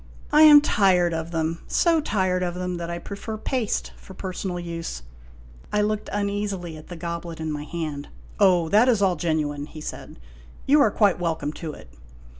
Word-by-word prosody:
I 300 - +6
am 300 -2 +10
tired 185 - +3
of 160 0 -3
them 165 0 -2
so 335 -2 +3
tired 185 -7 0
of 175 -1 -2
them 180 0 -3
that 170 0 -5
I 170 - -3
prefer 200 +5 -6
paste 230 -1 -2
for 190 - -13
personal 185 -1 -4
use." 165 - -5 0.7
I 210 - +2
looked 215 0 -2
uneasily 200 -4 -2
at 155 - -12
the 175 - -8
goblet 170 0 -5
in 160 -1 -3
my 150 0 -4
hand. 155 -4 -5 0.2
" - - -21
Oh, 180 -5 +4
that 220 +7 +5
is 220 -5 +3
all 185 -2 +3
genuine," 150 -3 -2
he 155 - -10
said. 150 - -8 0.3
" 65 - -22
You 290 +2 +5
are 230 - +5
quite 200 -4 +2
welcome 160 -4 -2
to 155 0 -6
it. - - -13
175 Hz, 195 wpm, -24 LUFS, 165-205 Hz, 0.7 s, am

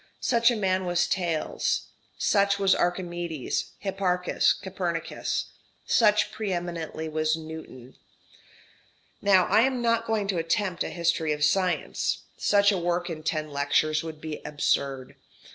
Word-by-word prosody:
Such 235 -1 +3
a 240 - +1
man 190 -3 0
was 175 0 +2
Thales. 170 -4 -1 0.3
Such 200 -1 +2
was 195 -1 +4
Archimedes, 175 -4 -2
Hipparchus, 185 -2 +1
Copernicus. 180 -4 -3 0.3
Such 210 -2 +3
pre 215 -3 -3
eminently 170 -2 -4
was 155 0 0
Newton. 155 -6 -10 1.3
Now 190 -3 +5
I - - +4
am 260 +1 +1
not 230 -1 +1
going 215 -3 0
to 185 -4 0
attempt 175 +3 0
a - - -4
history 165 -2 0
of 150 0 -3
science. 180 +4 +1
Such 200 0 +4
a 195 - 0
work 175 0 -1
in 155 -1 -6
ten 155 -1 -2
lectures 145 +2 +1
would 160 -2 -7
be 155 -1 -6
absurd. 140 -3 -1
175 Hz, 135 wpm, -26 LUFS, 155-195 Hz, 1.3 s, Now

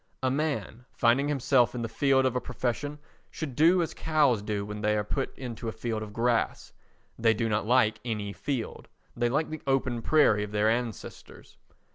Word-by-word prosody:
A 130 - +2
man, 130 -5 -2
finding 125 +4 +3
himself 135 -3 +2
in 120 - -3
the - - -1
field 135 +3 +2
of 130 -1 +1
a 125 - 0
profession, 130 +4 -3 0.3
should 145 -6 -6
do 170 +5 +5
as 165 - -5
cows 145 -8 +2
do 105 -1 -3
when 105 0 -6
they 105 0 +2
are 105 - 0
put 135 +6 -3
into 120 -2 -6
a - - -1
field 110 -1 -3
of 105 -1 -7
grass. 115 +1 -1 0.5
They 115 -1 +3
do 115 +1 -1
not 105 0 -1
like 120 -3 +3
any 105 -4 -3
field; 130 -3 -4 0.3
they 120 0 +1
like 150 +5 0
the 155 - -5
open 130 -3 0
prairie 115 -8 +4
of 105 0 -7
their 105 +1 +3
ancestors. 115 - -6
120 Hz, 190 wpm, -28 LUFS, 110-135 Hz, 0.5 s, do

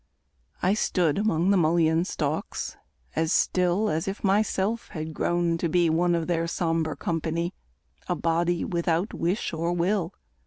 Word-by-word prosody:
I 185 - +4
stood 180 -6 +1
Among 195 -3 +2
the 200 - +4
mullein 165 0 +3
stalks 150 -3 -3 0.4
as 160 +1 +1
still 180 +4 +2
As 160 +3 -1
if 195 +1 -4
myself 205 +2 +1
had 155 -1 -6
grown 170 0 0
to 170 - 0
be 170 0 +3
One 175 +2 +2
of 165 -1 -1
their 165 -1 0
sombre 165 -2 -1
company, 165 +1 -2 0.5
A 180 - 0
body 170 +1 0
without 170 +2 0
wish 175 +3 -1
or 165 +2 -1
will. 180 +1 0
170 Hz, 150 wpm, -26 LUFS, 165-180 Hz, 0.5 s, I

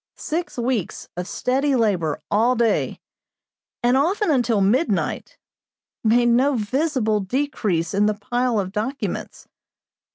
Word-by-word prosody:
Six 330 -1 -4
weeks 240 -5 -2
of 180 +1 -4
steady 270 +5 0
labor 185 - 0
all 230 +5 +3
day, 230 -2 0 0.8
and 245 +1 +4
often 350 +7 +2
until 240 -6 +2
midnight, 225 - 0 0.7
made 240 +2 +4
no 260 +4 +3
visible 240 -1 0
decrease 205 - -1
in 205 +1 +3
the 215 - +1
pile 240 +2 0
of 190 -2 -3
documents. 230 +7 -4
240 Hz, 120 wpm, -22 LUFS, 210-265 Hz, 0.8 s, and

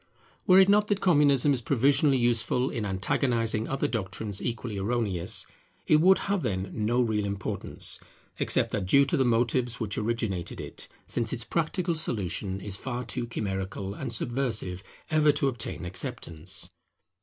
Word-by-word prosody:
Were 185 - +7
it 190 - +7
not 210 +1 +4
that 205 -2 +1
Communism 145 -6 +4
is 125 - -1
provisionally 140 +3 +3
useful 120 +1 +1
in 110 -3 -3
antagonizing 115 +3 0
other 135 0 0
doctrines 100 -2 -2
equally 115 -3 -3
erroneous, 100 -3 0 0.4
it 155 - +5
would 190 +3 +6
have, 200 -2 0
then, 95 -5 -2
no 115 +3 0
real 110 -3 0
importance, 100 -1 -3 0.4
except - - +1
that 100 -4 -2
due 140 +8 +6
to 140 - 0
the 135 - +3
motives 120 0 +1
which 105 -3 -2
originated 110 -5 -2
it; - - -6 0.2
since 115 -2 -2
its 120 -3 -2
practical 170 +5 -1
solution 100 - -2
is 100 -1 -3
far 125 +1 -4
too 120 0 -3
chimerical 95 -3 -3
and 125 +3 -5
subversive 115 -6 -2 0.3
ever 155 -1 +5
to 140 -1 +1
obtain 120 -7 -3
acceptance. 90 0 -4
115 Hz, 155 wpm, -28 LUFS, 100-135 Hz, 0.4 s, Were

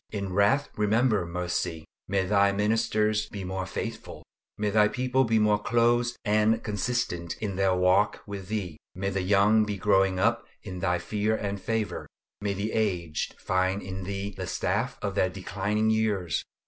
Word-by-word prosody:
In 100 -3 -4
wrath 130 +9 +3
remember 105 -2 +2
mercy. 85 -2 -3 0.2
May 95 -1 +1
Thy 100 +1 +3
ministers 110 +1 +1
be 100 -2 -6
more 95 0 -3
faithful. - - -6 0.3
May 105 0 0
Thy 105 0 +5
people 130 +3 +1
be 115 -1 +2
more 105 -1 +3
close 120 +2 +2
and 110 +1 +2
consistent 105 -5 -2
in 100 -3 -3
their 95 -1 +2
walk 90 +3 +2
with 100 -3 -7
Thee. 95 -7 -3 0.2
May 95 +2 -2
the 95 0 -1
young 100 +3 +4
be 105 -1 -3
growing 95 -1 +3
up 115 +5 +2 0.2
in 95 -3 -6
Thy 90 -1 +1
fear 105 +5 -1
and 100 -2 -3
favor; 110 -3 -2 0.3
may 100 -1 -1
the 105 +3 -2
aged 90 -8 -1
find 95 +2 0
in 95 0 -5
Thee 100 +1 -4
the 95 -1 -5
staff 115 +11 -1
of 100 -2 -1
their 95 -1 +2
declining 100 +3 -1
years. 105 -8 0
100 Hz, 165 wpm, -27 LUFS, 95-110 Hz, 0.3 s, Thy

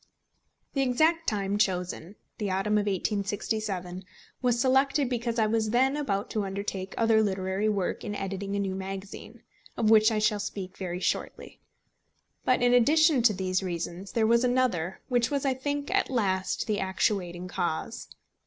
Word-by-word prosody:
The 275 - +1
exact 315 +6 +2
time 200 -1 -1
chosen, 180 -1 -1 0.2
the 210 -2 -1
autumn 205 +3 +1
of 205 - -2
1867, 200 -2 -2 0.4
was 245 -2 +2
selected 270 +2 +3
because 235 -1 -2
I 220 - +3
was 220 0 0
then 260 +4 +3
about 205 -9 -2
to 215 - -1
undertake 195 -1 -4
other 225 -1 +4
literary 195 0 0
work 200 -4 -1
in 205 - -4
editing 195 0 -4
a - - 0
new 195 -1 -1
magazine, 195 +1 -7 0.3
of 220 -1 +2
which 220 +1 +6
I 220 - 0
shall 210 0 +2
speak 195 -2 -5
very 180 -2 -4
shortly. - - -3 0.8
But 255 -1 +2
in 245 0 +4
addition 295 +3 +5
to 225 -2 +4
these 185 -1 -1
reasons 175 +1 -5
there 225 -2 +2
was 235 +2 +4
another, 245 -9 0
which 245 -2 +1
was, 280 -1 -1
I 270 - +2
think, 285 +2 -3
at - - +2
last 190 -7 0
the 210 -2 -1
actuating 185 -2 -1
cause. 180 +6 -3
210 Hz, 160 wpm, -28 LUFS, 190-245 Hz, 0.8 s, which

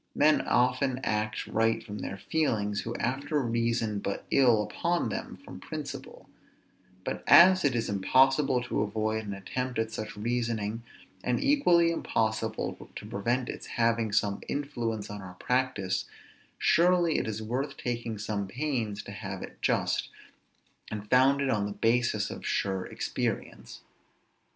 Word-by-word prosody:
Men 155 +1 +4
often 125 +1 +2
act 110 0 -1
right 115 0 +1
from 105 -2 -7
their 100 - -5
feelings, 105 -3 0
who 115 +1 -5
afterwards 135 0 -1
reason 115 -3 0
but 100 0 -4
ill 120 -6 +4
on 175 0 +2
them - - -5
from - - -9
principle; - - -7 0.8
but - - -4
as 185 +1 +8
it 135 -4 +2
is 115 -1 0
impossible 130 +6 +3
to 120 - -1
avoid 110 +1 -1
an 100 - -3
attempt 125 +6 -4
at 110 0 -1
such 110 -1 -6
reasoning, 115 -1 -1 0.4
and 125 -1 +1
equally 175 -13 +4
impossible 110 -7 -2
to - - -7
prevent 120 +5 -1
its - - -6
having 115 -2 +2
some 100 -1 +1
influence 120 -7 -3
on 105 -1 -6
our 90 -1 -10
practice, 125 -4 0 0.5
surely 175 -2 +3
it - - -3
is 110 0 -3
worth 135 +6 -3
taking 120 -2 -3
some 100 -1 -3
pains 115 -4 -2
to 100 - -9
have 95 -2 -6
it - - -11
just, - - +1 0.8
and 105 -1 -6
founded 135 +1 +4
on 105 -2 +1
the 105 - -5
basis 115 -2 +1
of - - -8
sure 95 -2 -1
experience. - - -4
115 Hz, 145 wpm, -29 LUFS, 105-130 Hz, 0.8 s, as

